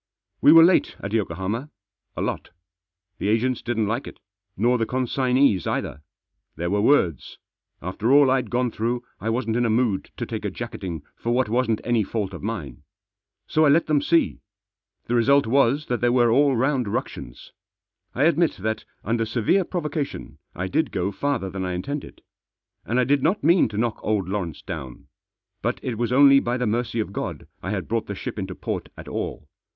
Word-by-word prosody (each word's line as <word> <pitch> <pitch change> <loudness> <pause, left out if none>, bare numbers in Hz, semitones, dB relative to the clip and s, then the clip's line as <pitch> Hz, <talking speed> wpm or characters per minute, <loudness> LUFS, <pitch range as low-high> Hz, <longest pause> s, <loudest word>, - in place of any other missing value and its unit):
We - - +7
were 165 0 +9
late 175 +2 +3
at 100 +2 -5
Yokohama. 105 - -2 0.5
A - - -1
lot. - - -3 0.7
The - - -2
agents 115 +3 +1
didn't 115 -2 -1
like 115 +6 -2
it, - - -11 0.4
nor 120 +4 +2
the 115 - 0
consignees 130 -5 +1
either. 75 - -3 0.5
There 85 +3 -3
were 100 0 +2
words. 95 - +2 0.5
After 100 +7 -1
all 140 -1 +6
I'd 130 -4 +1
gone 125 0 0
through 120 +3 -2 0.2
I 110 - -3
wasn't 115 -1 0
in 120 - +2
a 115 - +1
mood 110 -3 +1
to - - -3
take - - -5
a - - -1
jacketing 85 -5 -6
for 120 - -2
what 125 -2 +1
wasn't 115 -1 +1
any 120 -3 +2
fault 100 -1 -3
of 90 - -7
mine. 95 - -5 0.6
So 155 - +2
I 150 - +5
let 160 +4 +4
them 150 -2 +2
see. 165 +3 +2 0.7
The 120 - -3
result 135 +4 +4
was 140 +4 +2
that 120 - -2
there 120 0 +3
were 120 -2 +4
all 140 +2 +4
round 130 0 +1
ructions. 100 - -5 0.6
I 130 - +1
admit 165 +1 +3
that, 110 +3 -3 0.2
under 115 0 0
severe 115 - +1
provoca 155 -4 -2
tion, - - -10 0.2
I 95 +2 -3
did 155 +12 0
go 95 +2 -1
farther 120 -4 -2
than 95 0 -4
I 90 -1 -2
intended. 140 +12 -5 0.6
And 120 +3 0
I - - +4
did 140 +2 +2
not 165 +6 +1
mean 170 +4 +5
to 105 - -6
knock 115 0 -1
old 105 -4 0
Lawrence 95 -6 -4
down. 65 -3 -8 0.5
But - - -1
it 125 - -2
wad 120 0 0
only 140 +1 +7
by 120 -1 -1
the 125 - -1
mSrcy 115 +1 -1
of 105 -3 -3
God - - -4 0.2
I 95 - -5
had 95 -4 -3
brought 115 0 -1
the 100 - -4
ship 100 - -5
into 95 -1 -5
port - - -4
at - - -10
all. - - -5
120 Hz, 195 wpm, -24 LUFS, 105-135 Hz, 0.7 s, were